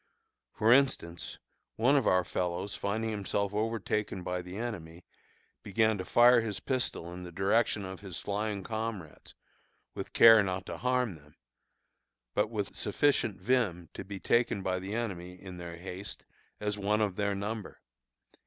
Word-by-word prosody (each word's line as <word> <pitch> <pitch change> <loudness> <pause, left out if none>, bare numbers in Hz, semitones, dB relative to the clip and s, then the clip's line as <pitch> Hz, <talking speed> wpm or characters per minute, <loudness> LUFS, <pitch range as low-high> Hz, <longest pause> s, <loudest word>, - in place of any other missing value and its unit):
For 110 +2 +5
instance, 125 -11 +1 0.4
one 125 +6 +4
of 135 -5 +3
our 90 0 +4
fellows 90 +3 -2
finding 110 +2 -2
himself 100 -1 -1
overtaken 105 -3 -1
by 90 0 -2
the 90 +2 -8
enemy, 90 -8 -6 0.6
began 110 +1 +1
to 95 - -4
fire 120 +2 +6
his 110 -3 -3
pistol 120 -9 -2
in 90 - -7
the 90 -1 -8
direction 100 +3 +1
of 95 0 -7
his 95 -4 -6
flying 105 -1 -2
comrades 110 -7 -5 0.6
(with - - -6
care 115 -1 +9
not 95 -1 -2
to 85 - -6
harm 125 -4 +1
them), 75 0 -21 1.0
but 105 +1 +1
with 105 -3 -3
sufficient 110 -1 +1
vim 95 -6 0
to - - -6
be 100 -1 -7
taken 115 0 +1
by 95 0 0
the 95 +3 -5
enemy, 90 -6 -4
in 95 -2 -9
their 85 -1 -7
haste, 90 +2 -7 0.3
as 105 -1 -2
one 105 +2 +1
of 100 -4 0
their 100 0 0
number. 105 +1 -5
100 Hz, 155 wpm, -31 LUFS, 90-110 Hz, 1.0 s, care